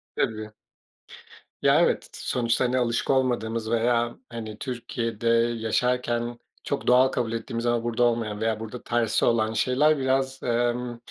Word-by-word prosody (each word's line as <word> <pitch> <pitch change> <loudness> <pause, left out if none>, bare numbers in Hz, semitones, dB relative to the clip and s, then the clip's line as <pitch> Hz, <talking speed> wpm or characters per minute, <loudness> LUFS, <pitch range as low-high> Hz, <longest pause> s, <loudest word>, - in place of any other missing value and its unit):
Tabii. 110 -1 -1 1.1
Ya, - - +5
evet, - - +2
t - - -15
t - - -11
sonuçta, 120 0 +1
hani, 125 +1 +1
alışık 120 -2 0
olmadığımız 115 -4 0
veya, 120 0 +1
hani, 110 -2 -7
Türkiye'de 115 -3 -4 0.3
yaşarken 120 +1 0 0.2
çok - - -3
doğal 125 +1 +6
kabul 120 -3 -2
ettiğimiz 115 +1 -4
ama 120 -1 +1
burada 120 0 0
olmayan 115 -3 0
veya 110 -1 0
burada 115 +2 -7
tersi 120 -2 +1
olan 110 -2 +2
şeyler 135 +7 +3
biraz, 135 0 0
emm, 120 0 0
120 Hz, 145 wpm, -25 LUFS, 115-125 Hz, 1.1 s, doğal